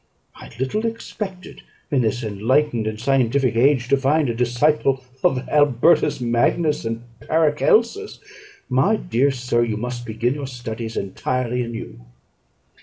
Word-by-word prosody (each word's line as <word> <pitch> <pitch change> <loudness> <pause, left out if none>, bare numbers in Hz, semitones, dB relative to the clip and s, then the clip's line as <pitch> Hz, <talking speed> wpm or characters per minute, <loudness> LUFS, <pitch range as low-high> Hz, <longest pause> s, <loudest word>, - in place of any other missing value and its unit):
I - - -12
little 130 - -1
expected, 210 -4 -7 0.3
in 140 -3 +2
this 120 +1 -1
enlightened 115 +3 0
and 110 0 -4
scientific 130 -1 +1
age, 125 0 +3
to 140 - +4
find 140 +1 +2
a - - -3
disciple 130 +3 +1 0.2
of 130 -1 +1
Albertus 145 +1 +3
Magnus 125 +5 +1
and 115 +1 -3 0.2
Paracelsus. 215 - +1 0.5
My 130 +12 +2
dear 140 - +1
sir, 125 -2 0
you 110 -3 -2
must 120 +1 -4
begin 115 +3 0
your 140 -1 -5
studies 115 -3 -6
entirely 125 +5 -2
anew." 115 - -6
125 Hz, 130 wpm, -21 LUFS, 115-150 Hz, 0.5 s, to